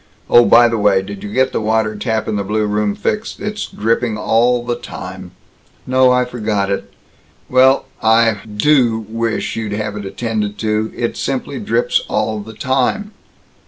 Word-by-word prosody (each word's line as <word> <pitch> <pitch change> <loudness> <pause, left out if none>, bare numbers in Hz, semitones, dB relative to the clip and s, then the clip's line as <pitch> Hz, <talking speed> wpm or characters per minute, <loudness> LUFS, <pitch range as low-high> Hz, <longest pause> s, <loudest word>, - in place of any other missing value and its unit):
Oh, 120 0 +7
by 120 0 +6
the 115 -1 -1
way, 100 -2 +3
did 100 0 -8
you 105 - -7
get 130 +3 +2
the - - -2
water 110 0 0
tap 110 0 -2
in 110 - -1
the 100 - -1
blue 105 +2 -1
room 105 0 0
fixed? 215 +1 -3
It's 210 +1 -4
dripping 115 +1 -1
all 120 +3 +2
the 120 0 -1
time." - - -8 0.6
"No, 130 0 +4
I 125 0 +2
forgot 105 -5 -2
it." 100 - -3 0.6
"Well, 130 +1 +4 0.2
I 115 0 +4
do 115 0 +2
wish 115 0 -2
you'd 110 -2 -3
have 105 0 -3
it 105 -1 -6
attended 105 0 -3
to. 110 0 -1
It - - -2
simply - - -3
drips - - +1
all 110 -1 -1
the 110 +2 -9
time." 135 - 0
110 Hz, 170 wpm, -17 LUFS, 105-125 Hz, 0.6 s, Oh